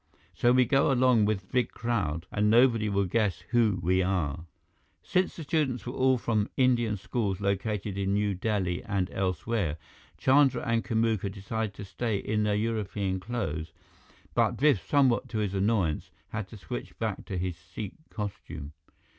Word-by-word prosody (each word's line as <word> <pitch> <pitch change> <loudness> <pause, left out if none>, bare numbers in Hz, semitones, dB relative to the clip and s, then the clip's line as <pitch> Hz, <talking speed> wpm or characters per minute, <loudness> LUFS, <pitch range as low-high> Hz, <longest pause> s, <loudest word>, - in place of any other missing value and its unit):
So 120 +8 +3
we 125 0 +5
go 135 +3 +3
along 125 -4 +4
with 100 -2 -2
big 125 -3 +2
crowd, 95 -9 -2
and 105 0 +2
nobody 115 -2 +4
will 100 -1 +1
guess 105 0 0
who 115 -5 +3
we 95 +2 +3
are." 85 -4 -1 0.6
Since 180 - +1
the 165 - -6
students 145 -4 0
were 125 - -4
all 130 -1 +3
from 110 -3 0
Indian 120 -5 +3
schools 100 -1 -2
located 100 0 -1
in 100 0 0
New 105 -1 +1
Delhi 95 -2 -1
and 100 -4 -1
elsewhere, 95 -2 -1 0.4
Chandra 135 - +4
and 115 -1 +1
Kamuka 110 -3 0
decided 100 +1 -4
to 100 - -7
stay 110 +2 -2
in 105 +2 -1
their 105 -1 +1
European 105 -3 -1
clothes; 90 -7 -4 0.6
but - - +2
Biff, 135 - +3
somewhat 135 -4 +3
to 110 - -3
his 105 -3 -1
annoyance, 95 -5 +1 0.2
had 110 -3 -4
to 110 - -11
switch - - -7
back - - -2
to 95 - -4
his 90 -1 -2
Sikh 90 +4 -8 0.2
costume. 90 - -6
105 Hz, 165 wpm, -28 LUFS, 95-115 Hz, 0.6 s, we